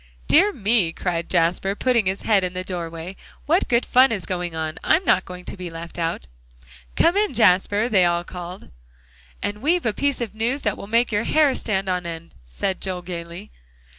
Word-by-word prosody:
"Dear 390 +7 +5
me!" 210 - +2
cried 170 -2 -3
Jasper, 180 +3 +1
putting 235 -3 +1
his 190 +1 -2
head 205 -4 +3
in 180 0 -2
the 185 0 -4
doorway, 170 0 -6 0.3
"what 335 +5 +2
good 235 0 +2
fun 255 +1 +5
is 200 -5 -2
going 175 -2 -4
on? 160 -1 -4
I'm 365 +4 +3
not 185 - +3
going 180 0 -9
to - - -4
be 180 -2 -6
left 170 +1 -8
out." 165 - -2 0.7
"Come 340 - +3
in, 415 0 +1
Jasper," 205 +1 +3
they 200 -6 +3
all 175 0 +1
called. 180 +1 -9 0.7
"And 210 +1 -3
we've 335 +4 +1
a 225 - +1
piece 280 +3 -1
of 235 -4 -4
news 235 +6 -2
that 210 -3 0
will - - -9
make 230 +2 +2
your 210 +1 0
hair 300 -3 +3
stand 195 -6 -1
on 180 -2 -1
end," 165 0 -8
said 185 - -3
Joel 185 -2 -4
gaily. 175 +2 -8
190 Hz, 195 wpm, -22 LUFS, 175-235 Hz, 0.7 s, Dear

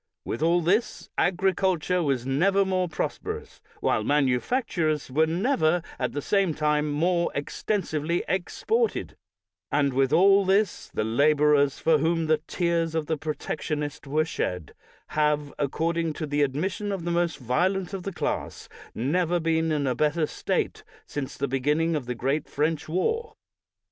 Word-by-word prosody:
With 115 - -4
all 170 +2 +3
this, 195 +8 0
agriculture 180 -1 +1
was 135 -6 0
never 190 +9 +2
more 185 -2 0
prosperous, - - -5 0.2
while 110 - +1
manufactures 150 - 0
were 160 +4 +3
never, 175 - +1 0.2
at - - -1
the 145 - -3
same 195 -6 +1
time, 150 0 +1
more 170 +3 +1
extensively 165 0 -1
exported; 445 - -1 0.6
and 140 -2 +2
with 135 +1 +2
all 195 +5 +6
this, 195 +1 +1
the - - -1
la 140 +8 +3
borers, 145 -2 +3
for 160 -2 +3
whom 165 +2 +1
the 155 -1 +2
tears 170 -2 0
of 160 -2 0
the 160 - 0
Protectionist 150 -1 -4
were 155 +3 +1
shed, 90 - -3 0.4
have, 150 -1 0
according 165 +3 0
to 155 - -4
the 145 0 0
admission 185 +9 -1
of 190 -4 -4
the 175 - -1
most 170 -3 0
violent 180 - 0
of 195 - -3
the 195 - -4
class, - - -3 0.3
never 175 +8 +1
been 160 0 +1
in 150 -2 0
a 130 - +1
better 150 +5 +1
state - - -2 0.2
since 140 -3 -5
the 140 - -1
beginning 150 +5 +1
of 135 -5 -3
the 125 - -2
great 135 +5 -1
French 155 +1 -1
war. 450 - -1
160 Hz, 155 wpm, -26 LUFS, 145-180 Hz, 0.6 s, all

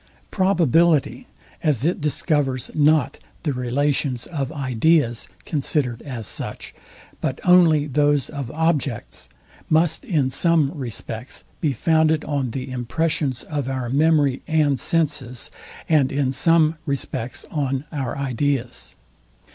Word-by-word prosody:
Probability, 170 - +2 0.3
as 145 -4 +1
it 175 0 0
discovers 145 -3 0
not 150 -2 +2 0.2
the 150 - 0
relations 130 0 0
of 140 -5 -4
ideas, 135 -2 +1 0.2
considered 135 -5 -1
as 125 -6 -6
such, - - -4 0.5
but - - -2
only 170 -5 +5
those 145 -1 +1
of 140 -5 -6
objects, 150 -5 -2 0.4
must 160 - +2
in 155 - 0
some 160 0 +2
respects 125 -3 -5 0.2
be 155 - +1
founded 160 +3 +2
on 140 -4 -1
the 130 +2 -5
impressions 130 +1 -1
of 145 -4 -3
our 130 -2 -3
memory 145 -1 +2
and 150 -4 +2
senses, 145 -7 -1 0.4
and 145 -4 +3
in 135 -2 0
some 160 +3 +3
respects 130 -3 -4
on 135 -2 -1
our 135 -5 -3
ideas. 135 -2 -2
145 Hz, 115 wpm, -22 LUFS, 130-155 Hz, 0.5 s, only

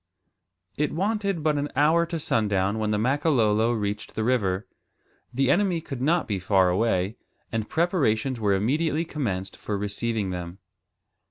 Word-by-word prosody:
It 150 - +1
wanted 200 -1 -1
but 150 -2 +2
an 145 +1 -2
hour 160 +4 +3
to 165 - -3
sundown 105 -7 0
when 110 -1 0
the 105 - +1
Makololo 120 -3 +2
reached 105 -2 -3
the 110 - -1
river. 105 -5 +1 0.7
The 135 +1 +2
enemy 190 -3 +2
could 135 -5 -7
not 165 +5 +2
be 100 -3 -1
far 95 0 +3
away, 95 +1 0 0.3
and 110 -1 -2
preparations 135 - +1
were 100 -3 +2
immediately 150 - 0
commenced 95 - -3
for 105 - -3
receiving 105 0 -2
them. 90 0 -6
115 Hz, 150 wpm, -25 LUFS, 105-155 Hz, 0.7 s, hour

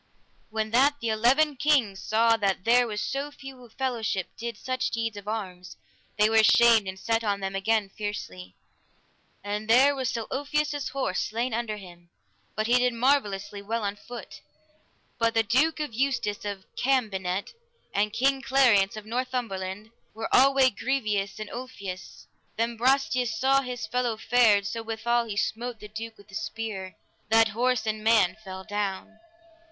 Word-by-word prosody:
When 220 0 -2
that 275 +5 +4
the 235 - -2
eleven 260 +7 +3
kings 245 -9 +2
saw 230 +2 +3
that 195 -3 0
there 245 +2 +4
was 210 -1 -3
so 275 +2 -3
few 270 -3 -11
a 240 - -15
fellowship 225 -6 -2
did 235 -2 -5
such 255 +1 -2
deeds 225 -2 -2
of 205 0 -9
arms, 185 -5 -5 0.4
they 210 0 +5
were 225 0 +2
ashamed 220 -1 +6
and 190 0 -5
set 225 +3 0
on 200 -2 0
them 195 0 -4
again 210 +1 +1
fiercely; 95 - -6 0.9
and 210 +2 -4
there 265 +5 +6
was 260 -2 -1
Sir 230 -2 -3
Ulfius's 290 +1 -1
horse 260 -9 -2
slain 230 +3 -2
under 225 -2 -2
him, 175 -3 -13 0.5
but 215 - -1
he 245 +2 +4
did 250 0 +2
marvellously 210 -6 0
well 225 +2 -3
on 200 0 -2
foot. 240 +3 -10 0.8
But 230 0 +1
the 225 - +4
Duke 265 +9 +2
Eustace 245 -7 -1
of 200 -2 -5
Cambenet 200 -8 0 0.4
and 210 +1 +1
King 265 +4 +1
Clariance 230 -8 +3
of 215 - -8
Northumberland, 220 -4 -3 0.2
were 225 0 -1
alway 270 0 +5
grievous 210 -4 -2
on 215 - -5
Ulfius. 200 -7 -8 0.3
Then 230 +1 0
Brastias 250 -1 +1
saw 270 +3 +3
his 250 -4 -5
fellow 240 0 -1
fared 220 -3 +4
so 230 +2 -3
withal 230 +1 0
he 210 -3 -6
smote 235 +2 -2
the 210 - -9
duke 225 +1 -7
with 200 0 -18
a - - -19
spear, 215 -3 -5 0.3
that 225 0 +5
horse 240 +2 0
and 215 0 -2
man 210 -5 +4
fell 190 -1 -8
down. 205 +1 -4
225 Hz, 160 wpm, -27 LUFS, 205-250 Hz, 0.9 s, ashamed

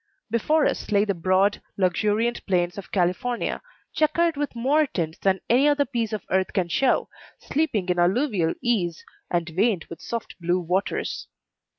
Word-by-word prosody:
Before 300 +7 +2
us - - -2
lay 205 0 +4
the 200 - 0
broad, 185 +3 +2 0.2
luxuriant 210 +5 +1
plains 175 -2 +1
of 195 - -11
California, 190 +7 0 0.3
checkered 320 +2 +2
with 285 -3 -3
more 285 +6 +2
tints 165 -7 -3
than 190 -1 +1
any 255 +5 +4
other 290 -1 +3
piece 235 -5 -2
of 215 -2 -4
earth 190 0 +1
can 185 -4 0
show, 255 +9 +2 0.3
sleeping 270 - -1
in 180 -1 +1
alluvial 185 - +2
ease, 180 -9 0 0.2
and 170 -1 0
veined 185 +2 +1
with 165 - -8
soft 230 -4 -5
blue 175 +2 +1
waters. 180 +3 -2
200 Hz, 160 wpm, -24 LUFS, 180-245 Hz, 0.3 s, lay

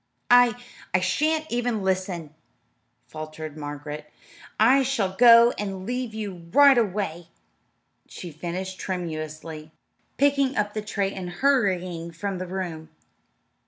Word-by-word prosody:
"I 245 -1 +6 0.4
I - - +5
shan't 310 +12 +1
even 240 -3 -1
listen," 185 -5 -2 0.7
faltered 155 +1 -8
Margaret. 150 0 -7 0.5
"I 255 +6 +6
shall 225 -8 -1
go 235 +1 +7
and 195 -2 -4
leave 245 -1 -3
you 190 -6 -6
right 285 +2 +7
away," 185 -6 -2 0.8
she 175 - -9
finished 180 +4 -5
tremulously, 155 -3 -5 0.5
picking 280 -1 +2
up 210 0 0
the 215 - -3
tray 200 -2 -2
and 185 -2 -6
hurrying 185 -7 0
from 190 +3 -4
the 185 - -5
room. 175 -4 -5
190 Hz, 120 wpm, -25 LUFS, 165-235 Hz, 0.8 s, go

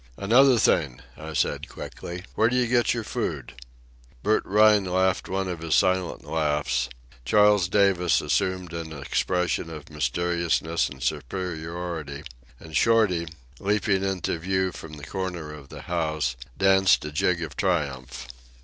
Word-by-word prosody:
"Another 125 +5 +5
thing," 70 - +2
I 80 0 -8
said 75 - -1
quickly. 90 +1 -8
"Where 110 +1 +3
do 125 - -1
you 125 -1 +3
get 120 0 +2
your 115 - -3
food?" 85 - -4 0.7
Bert 110 +1 +2
Rhine 105 0 +5
laughed 95 +1 +1
one 95 0 -1
of 90 -3 -4
his 80 -1 0
silent 95 -1 +1
laughs; 75 -4 0 0.3
Charles 105 - +4
Davis 95 -4 +3
assumed 90 -2 -1
an 80 -1 -5
expression 85 +3 -1
of 75 -2 -9
mysteriousness 85 +3 0
and - - -9
superiority; 80 -2 -4 0.4
and 80 -1 -10
Shorty, 105 -7 +3 0.3
leaping 100 -1 +1
into 95 -3 -2
view 95 +2 0
from 80 -3 -10
the 75 -1 -9
corner 90 -5 -4
of 70 -3 -12
the - - -10
house, 80 -6 -1 0.2
danced 95 -3 +4
a 75 - -5
jig 85 +3 +1
of 80 - -7
triumph. 70 -9 -2
90 Hz, 140 wpm, -25 LUFS, 80-95 Hz, 0.7 s, Another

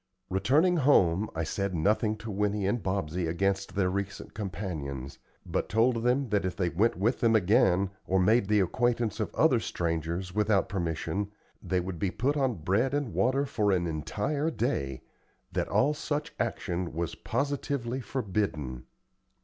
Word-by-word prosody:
Returning 140 - +3
home, 105 - +4
I 80 - -1
said 100 +3 -2
nothing 105 +6 +2
to 110 0 -6
Winnie 105 0 0
and 105 +4 0
Bobsey 90 -3 -1
against 95 +3 -1
their 95 -2 +2
recent 100 0 -4
companions, 80 -9 -5 0.3
but - - -2
told 115 +3 +3
them 125 +2 +1
that 105 -1 +1
if 95 -1 -2
they 90 -3 0
went 105 +8 +2
with 110 +8 +1
them 115 -1 +3
again, 95 -2 +3 0.2
or 95 +1 +2
made 105 +3 +4
the 105 0 +4
acquaintance 120 +3 0
of - - -2
other - - +4
strangers 85 +2 -2
without 105 -1 +2
permission, 95 +2 -2 0.3
they 95 - 0
would 90 -1 -4
be 95 - +1
put 130 +10 0
on 135 -5 +1
bread 115 - +2
and 145 -6 -2
water 135 +3 +2
for 105 -6 +1
an 90 -2 +1
entire 105 - -1
day 70 - -2 0.5
that - - -1
all 150 - +3
such 150 +1 -3
action 90 -7 -2
was 85 -2 -2
positively 135 -1 -2
forbidden. 95 - -2
100 Hz, 155 wpm, -29 LUFS, 90-120 Hz, 0.5 s, home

